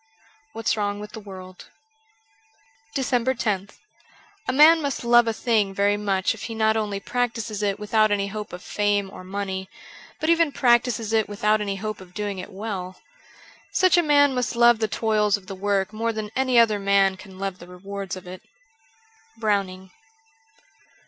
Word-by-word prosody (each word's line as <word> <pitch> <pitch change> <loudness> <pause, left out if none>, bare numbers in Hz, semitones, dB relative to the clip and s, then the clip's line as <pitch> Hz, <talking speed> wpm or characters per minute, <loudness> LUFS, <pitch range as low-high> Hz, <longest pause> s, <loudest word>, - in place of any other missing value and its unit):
' 290 +5 -34
What's 225 - 0
Wrong 205 -1 -2
with 210 0 -8
the - - -8
World' 185 -3 -11 1.3
381 260 -1 +1
DECEMBER 215 -5 0
loth - - -22 0.7
A - - +2
MAN 310 +5 +7
must 280 -4 -3
love 240 0 +5
a - - +2
thing 220 -4 0
very 200 +1 +2
much 195 -2 0
if 225 - -12
he 225 - -6
not 220 0 +2
only 210 -2 -2
practises 230 -2 -2
it 200 -1 0
without 215 +1 +2
any 205 -1 +1
hope 210 +1 -6
of 180 +1 -9
fame 205 -1 0
or 185 - -10
money, 190 0 -4 0.5
but 315 - +2
even 335 -2 +3
practises 240 -4 +2
it 220 -2 +2
without 210 +1 +1
any 200 -1 -2
hope 215 +1 -5
of 180 -1 -15
doing 205 -1 -3
it 185 - -8
well. 190 -2 -6 0.7
Such 370 -1 +4
a 350 - +5
man 285 -3 +4
must 250 -3 -1
love 235 -1 +5
the 220 - +1
toils 210 -1 +1
of 195 - -16
the 195 - -7
work 200 +1 -1
more 230 +1 -1
than 215 -1 -5
any 260 -2 +2
other 220 -3 +5
man 195 -1 +3
can 190 0 -13
love 195 -1 -4
the 175 - -12
rewards 195 +1 -6
of 185 - -10
it. 180 0 -9 0.5
' 445 0 -33
Browning. 195 -4 -1
210 Hz, 180 wpm, -24 LUFS, 195-235 Hz, 1.3 s, MAN